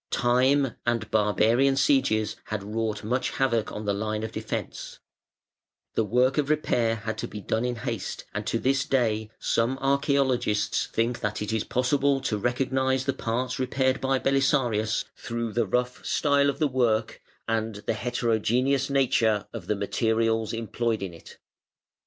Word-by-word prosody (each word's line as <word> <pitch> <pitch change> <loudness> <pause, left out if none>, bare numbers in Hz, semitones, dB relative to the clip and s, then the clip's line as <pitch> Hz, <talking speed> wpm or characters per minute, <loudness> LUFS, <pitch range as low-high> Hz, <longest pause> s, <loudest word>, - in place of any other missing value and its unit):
Time 130 +2 +2
and 115 -3 -1
barbarian 115 +5 +3
sieges 120 -6 +2
had 105 -2 -4
wrought 110 0 -3
much 125 +4 0
havoc 115 -5 +1
on 105 0 -6
the 100 - +1
line 110 +1 -2
of 110 - -4
defence, - - -5 1.0
the 115 - +1
work 125 +7 +2
of 145 -1 0
repair 120 -7 +1
had 110 0 -5
to - - -3
be 105 - -7
done 110 +3 -1
in 125 0 -1
haste, 115 -4 -4
and 105 +1 -4
to 115 - +1
this 135 +3 +1
day 110 -5 0
some 120 +3 0
archaeologists 135 -5 +1
think 120 +2 -1
that 105 0 -2
it 105 +1 -3
is 110 -1 0
possible 135 +2 +1
to 110 -5 -2
recognise 130 +2 0
the 135 - +1
parts 125 +5 -2
repaired 130 0 0
by 135 0 +2
Belisarius 130 -5 +1
through 115 -2 -4
the 115 -1 +1
rough 125 +4 -1
style 140 -1 +2
of 140 - -2
the 155 - +2
work 115 -5 0 0.3
and 110 -1 -1
the - - +1
heterogeneous 120 +4 0
nature 125 -6 +2
of 105 -7 -7
the 105 - +1
materials 110 +2 0
employed 115 -1 -2
in 95 -3 -5
it. 85 - -14
120 Hz, 160 wpm, -26 LUFS, 110-130 Hz, 1.0 s, barbarian